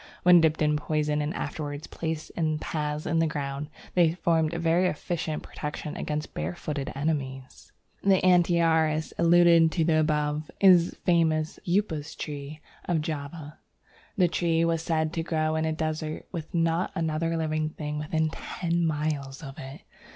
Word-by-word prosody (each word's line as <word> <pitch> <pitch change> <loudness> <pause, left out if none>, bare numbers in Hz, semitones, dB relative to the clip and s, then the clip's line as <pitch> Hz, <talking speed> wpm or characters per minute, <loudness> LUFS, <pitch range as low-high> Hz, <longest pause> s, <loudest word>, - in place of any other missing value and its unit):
When 180 -1 +7
dipped 160 -1 +2
in 150 0 +2
poison 150 0 0
and 150 +1 -2
afterwards 145 -2 -4
placed 160 -1 -4
in 155 -2 -1
paths 150 -1 -3
in 165 0 +1
the 165 - +3
ground, 145 -1 -4 0.2
they 170 -3 +4
formed 165 -3 +1
a 170 - -3
very 170 +2 +2
efficient 160 -1 -3
protection 150 0 -6
against 150 0 -4
barefooted 135 - -4
enemies. 135 -3 -4 0.3
The 195 -1 +4
Antiaris 165 -3 +3
alluded 170 -1 +6
to 165 -2 +2
above 150 -1 0
is 180 -3 +6
the - - -12
famous 160 -3 +2
Upas 175 -5 -1
tree 150 0 -6 0.2
of 170 -3 +1
Java. 150 0 -6 0.6
The 180 -2 +5
tree 165 -1 +1
was 165 -1 +1
said 160 -1 0
to 165 - -1
grow 155 -1 0
in 160 0 0
a 160 - 0
desert 155 0 -3
with 165 -4 -6
not 165 +1 +1
another 165 +1 -1
living 155 -1 -1
plant 150 -1 -5
within 155 +1 0
ten 170 0 -2
miles 150 -2 -2
of 135 -1 -9
it. 135 +2 -9
155 Hz, 155 wpm, -27 LUFS, 150-165 Hz, 0.6 s, When